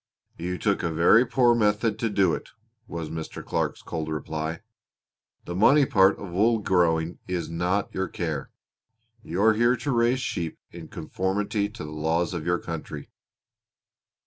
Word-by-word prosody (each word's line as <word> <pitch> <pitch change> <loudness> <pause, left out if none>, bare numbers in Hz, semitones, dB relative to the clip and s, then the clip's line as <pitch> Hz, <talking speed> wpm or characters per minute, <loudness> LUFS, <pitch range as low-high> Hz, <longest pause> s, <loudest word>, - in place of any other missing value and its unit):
"You 90 +2 -3
took 100 0 0
a 85 - -1
very 85 +10 +5
poor 120 -1 +4
method 105 -1 +1
to 115 - 0
do 95 -5 +2
it," - - -5 0.4
was 85 -4 -5
Mr. 80 -1 -6
Clark's - - -2
cold 80 -1 -4
reply. 80 +2 -4 0.8
"The 85 - -5
money 135 +10 +5
part 100 -7 +4
of 100 -3 -8
wool 110 +6 +3
growing 85 -4 +1
is 90 -3 -3
not 90 +4 -1
your 95 0 -1
care. 80 -7 -4 0.7
You 95 -1 -2
are 110 0 +6
here 120 +3 +3
to 130 +4 -2
raise 120 +1 +2
sheep 85 -10 -3
in 85 -2 -9
conformity 100 +6 -2
to 105 - -9
the 75 - -7
laws 80 +3 0
of 85 -2 -4
your 90 0 +2
country." 75 -4 -7
90 Hz, 160 wpm, -26 LUFS, 80-110 Hz, 0.8 s, are